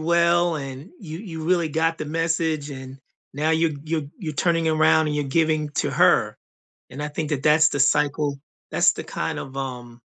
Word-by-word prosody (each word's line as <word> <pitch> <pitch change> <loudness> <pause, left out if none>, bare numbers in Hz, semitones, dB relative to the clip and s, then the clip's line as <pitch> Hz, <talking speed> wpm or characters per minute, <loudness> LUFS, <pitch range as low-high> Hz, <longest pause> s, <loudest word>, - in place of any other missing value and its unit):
well, 170 +1 +3
and 135 +4 -7
you 160 -4 -7
you 170 -6 -7
really 170 -1 +2
got 165 +2 0
the - - -4
message, 160 -1 -1
and 130 -1 -8 0.4
now 150 +3 0
you're 160 0 +2
you're 160 0 -2 0.2
you're 165 -8 -4
turning 165 +2 +1
around 160 0 +3
and 150 - -2
you're 145 - 0
giving 155 +1 +1
to - - 0
her, - - +3 0.5
and, 145 +3 -6
I - - -2
think 150 +1 -4
that 145 -3 -2
that's 155 +1 +5
the 145 - -3
cycle 145 0 +2 0.3
that's - - +4
the - - -6
kind - - -4
of, 135 - -8
um, 125 -3 -6
155 Hz, 190 wpm, -23 LUFS, 145-165 Hz, 0.5 s, that's